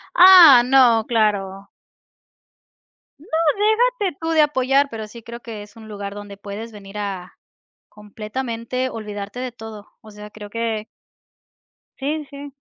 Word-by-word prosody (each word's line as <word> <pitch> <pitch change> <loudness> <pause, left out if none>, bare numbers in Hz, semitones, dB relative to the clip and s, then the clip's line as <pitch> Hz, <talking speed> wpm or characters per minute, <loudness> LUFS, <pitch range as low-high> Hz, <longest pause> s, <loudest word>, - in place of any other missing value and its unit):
Ah, 350 -9 +9
no, 245 -3 +4
claro. 200 -4 -1 1.5
No, 315 - -18 0.7
déjate 380 -9 -3
tú 325 - -4
de 315 - +4
apoyar, 280 -1 +2
pero 220 -3 -7
sí 230 +2 -12
creo 235 +1 -9
que 225 -3 -9
es 205 0 -18
un 220 -1 -13
lugar 200 -1 -7
donde 205 -1 -10
puedes 205 +3 -8
venir 200 -1 -11
a 195 -3 -6 0.5
completamente 230 +4 -5
olvidarte 210 -1 -7
de 255 -1 -5
todo, 220 -3 -11
o 215 - -15
sea, 210 0 -12
creo 210 -1 -11
que 225 -1 -3 1.1
Sí 300 +3 -3
sí. 280 0 -10
225 Hz, 135 wpm, -20 LUFS, 205-260 Hz, 1.5 s, Ah